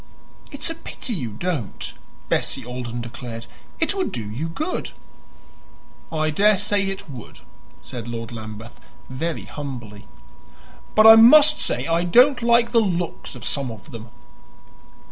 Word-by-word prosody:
"It's 280 Hz, +3 st, -1 dB
a -, -, -3 dB
pity 310 Hz, -6 st, -6 dB
you 130 Hz, -, -3 dB
don't," 140 Hz, -, -4 dB, 0.3 s
Bessie -, -, 0 dB
Alden 120 Hz, -1 st, -5 dB
declared. 120 Hz, -1 st, -7 dB, 0.3 s
"It 325 Hz, -, +1 dB
would 385 Hz, -2 st, -2 dB
do 110 Hz, -4 st, -5 dB
you 150 Hz, +9 st, -4 dB
good." 310 Hz, -, -3 dB, 1.2 s
"I 155 Hz, -1 st, 0 dB
daresay 205 Hz, +2 st, +2 dB
it 195 Hz, -3 st, -5 dB
would," 130 Hz, -7 st, -11 dB, 0.4 s
said 120 Hz, -3 st, -8 dB
Lord 115 Hz, -1 st, -6 dB
Lambeth 110 Hz, 0 st, -9 dB, 0.3 s
very 160 Hz, +5 st, -3 dB
humbly. 120 Hz, -8 st, -8 dB, 0.9 s
"But 215 Hz, -, +6 dB
I 225 Hz, 0 st, +11 dB
must 295 Hz, +7 st, +8 dB
say -, -, -2 dB
I 165 Hz, +1 st, +1 dB
don't 245 Hz, +9 st, +5 dB
like 235 Hz, 0 st, +3 dB
the 235 Hz, -, +5 dB
looks 175 Hz, -8 st, -3 dB
of 120 Hz, -1 st, -9 dB
some 140 Hz, -1 st, -2 dB
of 110 Hz, -4 st, -11 dB
them." 115 Hz, 0 st, -9 dB
155 Hz, 140 wpm, -22 LUFS, -, 1.2 s, I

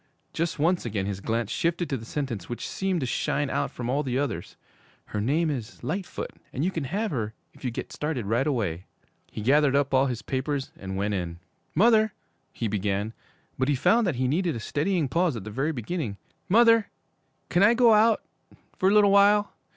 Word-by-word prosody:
Just 165 Hz, 0 st, -1 dB
once 170 Hz, +4 st, +2 dB
again 105 Hz, -4 st, -2 dB
his 100 Hz, -1 st, -3 dB
glance 115 Hz, +2 st, -2 dB
shifted 170 Hz, +4 st, 0 dB
to -, -, +1 dB
the 115 Hz, -3 st, -7 dB
sentence 120 Hz, -, -4 dB
which 120 Hz, -, -4 dB
seemed 190 Hz, -3 st, -1 dB
to -, -, 0 dB
shine 140 Hz, +3 st, -1 dB
out -, -, 0 dB
from 120 Hz, -, -6 dB
all 135 Hz, +4 st, +1 dB
the 130 Hz, -3 st, -2 dB
others. 140 Hz, -3 st, -3 dB, 0.5 s
'Her 105 Hz, -, -3 dB
name 155 Hz, +8 st, +1 dB
is 120 Hz, -5 st, -6 dB
"Lightfoot," 185 Hz, +4 st, -4 dB, 0.2 s
and 140 Hz, +5 st, -2 dB
you 185 Hz, -, +1 dB
can 160 Hz, -6 st, -3 dB
have 205 Hz, -, -2 dB
her 110 Hz, -6 st, -3 dB, 0.2 s
if -, -, -18 dB
you 130 Hz, -, 0 dB
get 120 Hz, -, -6 dB
started 150 Hz, -7 st, -2 dB
right 120 Hz, +7 st, +1 dB
away.' 100 Hz, -, -1 dB, 0.5 s
He -, -, -6 dB
gathered 140 Hz, +3 st, +4 dB
up 140 Hz, -1 st, +1 dB
all 135 Hz, +1 st, +4 dB
his 120 Hz, -3 st, -4 dB
papers 135 Hz, +1 st, -2 dB
and 95 Hz, 0 st, -6 dB
went 100 Hz, +1 st, 0 dB
in. 85 Hz, -3 st, -3 dB, 0.4 s
'Mother 220 Hz, +2 st, +4 dB, 0.2 s
' -, -, -45 dB
he 115 Hz, -, -3 dB
began; 100 Hz, +1 st, -1 dB, 0.5 s
but 130 Hz, -, +2 dB
he 145 Hz, -, +3 dB
found 225 Hz, -, +3 dB
that 175 Hz, -, 0 dB
he 130 Hz, +1 st, 0 dB
needed 170 Hz, +4 st, 0 dB
a -, -, -4 dB
steadying 155 Hz, +6 st, 0 dB
pause 170 Hz, +1 st, +1 dB
at 110 Hz, -, -5 dB
the 105 Hz, -, -7 dB
very 135 Hz, +8 st, 0 dB
beginning. 120 Hz, -, -4 dB, 0.3 s
'Mother 230 Hz, +1 st, +5 dB, 0.6 s
can 175 Hz, -, +2 dB
I 210 Hz, +4 st, +6 dB
go 235 Hz, -2 st, +6 dB
out 215 Hz, +1 st, +4 dB, 0.6 s
for 190 Hz, -, +4 dB
a -, -, +3 dB
little 205 Hz, -1 st, +6 dB
while? 205 Hz, +1 st, +5 dB
140 Hz, 205 wpm, -26 LUFS, 115-180 Hz, 0.6 s, I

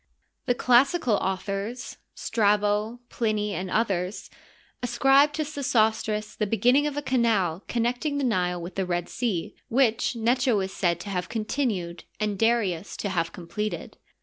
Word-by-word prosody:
The 245 Hz, -, +3 dB
classical 250 Hz, -1 st, +3 dB
authors, 195 Hz, +5 st, -3 dB, 0.2 s
Strabo, 210 Hz, +2 st, +1 dB
Plinv, 215 Hz, -2 st, 0 dB
and 185 Hz, -1 st, -4 dB
others, 190 Hz, -3 st, -1 dB, 0.5 s
ascribe 270 Hz, +4 st, +4 dB
to 310 Hz, -, -1 dB
Sesostris 220 Hz, -7 st, 0 dB
the 210 Hz, -, -1 dB
beginning 245 Hz, +8 st, +3 dB
of 290 Hz, -1 st, -4 dB
a 290 Hz, -, -2 dB
canal 215 Hz, -, +1 dB
connecting 245 Hz, +5 st, -1 dB
the 285 Hz, -, -1 dB
Nile 180 Hz, -7 st, 0 dB
with 175 Hz, +2 st, -7 dB
the 190 Hz, 0 st, -1 dB
Red 175 Hz, -1 st, -1 dB
Sea, 210 Hz, -9 st, -2 dB
which 240 Hz, -1 st, +2 dB
Necho'is 230 Hz, -4 st, +1 dB
said 170 Hz, -3 st, 0 dB
to 200 Hz, -, -6 dB
have 180 Hz, -1 st, -2 dB
continued 215 Hz, -6 st, -2 dB
and 210 Hz, -2 st, -1 dB
Darius 210 Hz, -6 st, +1 dB
to 200 Hz, -, -3 dB
have 170 Hz, -3 st, -1 dB
completed. 180 Hz, +5 st, -5 dB
215 Hz, 140 wpm, -26 LUFS, 190-245 Hz, 0.5 s, ascribe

